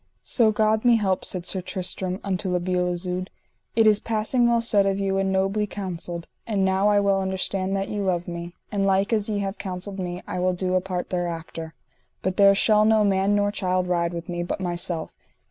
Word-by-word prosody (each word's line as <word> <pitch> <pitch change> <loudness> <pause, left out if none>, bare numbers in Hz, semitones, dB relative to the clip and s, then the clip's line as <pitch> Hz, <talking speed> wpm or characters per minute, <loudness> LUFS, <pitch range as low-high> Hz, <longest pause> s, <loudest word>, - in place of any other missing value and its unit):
So 225 -3 +3
God 215 0 +2
me 240 -1 +6
help, 195 -4 0
said 180 -2 -5
Sir 190 - 0
Tristram 185 +1 -2
unto 190 -1 -2
La 180 - +1
Beale 180 0 0
Isoud, 180 +1 -3 0.5
it 225 -1 +5
is 210 -1 +5
passing 230 +2 +1
well 235 0 +3
said 205 -4 +3
of 195 0 +1
you 195 -1 0
and 195 0 0
nobly 195 +2 +1
counselled; 175 -4 -5 0.2
and 200 -4 +1
now 190 +1 +2
I 205 -1 +4
well 200 -1 +2
understand 190 0 -1
that 195 - -2
ye 210 - -3
love 180 -3 -1
me; 170 0 -6 0.2
and 200 -2 +1
like 195 +3 +2
as 215 -1 0
ye 210 - -1
have 195 0 -4
counselled 190 +1 -5
me 180 0 -4
I 180 - -3
will 185 0 +1
do 185 0 -1
a 185 - +3
part 180 -1 -4
thereafter. 165 -2 -4 0.5
But 185 0 -1
there 200 0 +7
shall 210 +1 +4
no 215 0 +4
man 195 0 +2
nor 205 0 +2
child 185 -2 0
ride 170 -1 0
with 170 -1 -6
me, 175 -1 -3
but 175 - -3
myself. 175 -2 -2
190 Hz, 215 wpm, -24 LUFS, 180-205 Hz, 0.5 s, there